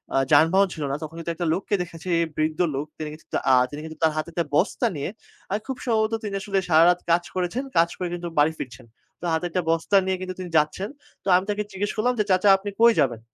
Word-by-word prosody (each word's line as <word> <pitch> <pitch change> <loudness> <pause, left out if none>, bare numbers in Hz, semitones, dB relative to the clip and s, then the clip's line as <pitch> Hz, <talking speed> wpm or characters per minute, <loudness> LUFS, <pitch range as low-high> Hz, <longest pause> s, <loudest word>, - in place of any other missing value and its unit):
আ - - +4
যানবাহন 165 +7 +5
ছিল 155 - -5
না। - - 0
তখন 155 +1 -7
কিন্তু 165 0 -3
একটা 170 +1 -2
লোককে 195 +3 -1
দেখেছি, 170 0 -7 0.3
বৃদ্ধ 155 0 0 0.2
লোক। 140 +2 -2
তিনি 155 -1 -5
কিছু 155 - -14 0.3
আ - - +6 0.2
যিনি 145 - -7
কিন্তু 160 0 -8
আ - - -6
তার 160 - +5
হাতে 155 +2 -2
একটা 170 0 -1
বস্তা - - +1
নিয়ে 145 +2 -3 0.4
আ - - 0
খুব 265 -2 -4
সম্ভবত 220 -2 +1
তিনি 205 -2 -4
আসলে 195 -1 0
সারারাত 170 +2 +5
কাজ 170 +1 +3
করেছেন। 185 +8 -1
কাজ 170 +1 +5
করে 180 - -2
কিন্তু 175 0 -4
বাড়ি 150 +2 +4
ফিরছেন। 120 -3 -8 0.4
তো - - -5
হাতে 160 +2 0
একটা 180 +2 0
বস্তা 165 +4 +1
নিয়ে 190 0 0
কিন্তু 185 0 -5
তিনি 180 -1 -5
যাচ্ছেন। 155 +7 0 0.3
তো - - -10
আমি 185 - +3
তাকে 210 0 0
জিজ্ঞেস 200 +2 -2
করলাম 240 +3 +1
যে, - - +4
"চাচা 185 +2 +4
আপনি 200 +1 -6
কই 235 0 +7
যাবেন?" 125 -6 +1
175 Hz, 240 wpm, -24 LUFS, 155-195 Hz, 0.4 s, কই